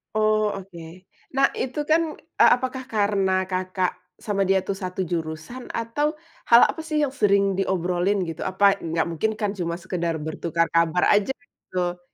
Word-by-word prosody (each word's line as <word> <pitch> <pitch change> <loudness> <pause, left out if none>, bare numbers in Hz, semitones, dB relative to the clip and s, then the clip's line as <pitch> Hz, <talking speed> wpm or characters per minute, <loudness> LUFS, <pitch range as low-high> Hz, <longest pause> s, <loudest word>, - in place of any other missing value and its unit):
Oh, 215 -1 +2
oke. 185 -4 -9 0.5
Nah, 275 0 +4
itu, 260 +3 -4
kan 315 0 +2 0.3
e - - +9
apakah 260 +1 -4
karena 200 -3 +1
Kakak 185 0 -1 0.2
sama 205 -2 -2
dia 190 -1 +2
tuh, 200 - -2
1 185 +1 -2
jurusan, 165 +8 -5
atau 290 +7 -1 0.3
hal 235 +1 +8
apa, - - -4
sih, 315 -1 -3
yang 280 - 0
sering 200 -6 +3 0.2
diobrolin, 185 +1 0
gitu? 165 -2 -6
Apa 195 +1 +3
nggak 165 0 -1
mungkin, 170 +7 0
kan, 210 -2 -1
cuma 170 -4 -3
sekedar 170 -2 -3
bertukar 165 +2 -1
kabar 165 +1 +3
aja, 205 +5 +2
gitu. 180 -7 -5
195 Hz, 160 wpm, -24 LUFS, 175-220 Hz, 0.5 s, e